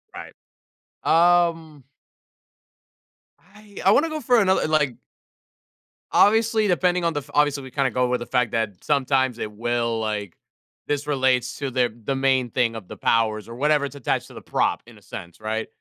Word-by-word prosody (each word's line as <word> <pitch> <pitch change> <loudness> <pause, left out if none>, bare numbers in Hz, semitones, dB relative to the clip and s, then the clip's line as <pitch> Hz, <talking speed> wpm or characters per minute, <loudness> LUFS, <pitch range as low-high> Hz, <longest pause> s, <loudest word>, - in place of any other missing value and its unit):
Right. - - -9 0.7
Um 165 -3 +2 1.7
I 210 -1 -17
I 195 - +6
wanna 315 +8 +3
go 310 -1 -4
for 245 -1 +3
another, 190 -5 +2
like 150 -6 +1 1.1
Obviously, 220 0 +3
depending 180 -1 +1
on 165 -1 +1
the 145 - -1
f 145 +1 -14
obviously, 145 -2 +2
we 130 - -10
kinda 135 -3 0
go 125 +1 +1
with 125 0 0
the 120 - -6
fact 125 -3 0
that 105 -5 -3
sometimes 130 -4 +1
it 105 - -4
will, 115 +1 -1
like, 105 -4 -4 0.5
this 145 0 -1
relates 130 -3 0
to 140 -2 -3
the 125 -3 0
the 135 - -1
main 130 -2 +1
thing 115 -1 0
of 105 -5 -8
the - - -9
powers 110 -1 0
or 115 - -8
whatever 150 +2 +2
it's 140 - -8
attached 140 - -2
to - - -15
the - - -10
prop - - 0
in - - -15
a - - -19
sense, 85 +3 -10
right? 110 +1 -3
135 Hz, 180 wpm, -23 LUFS, 120-165 Hz, 1.7 s, I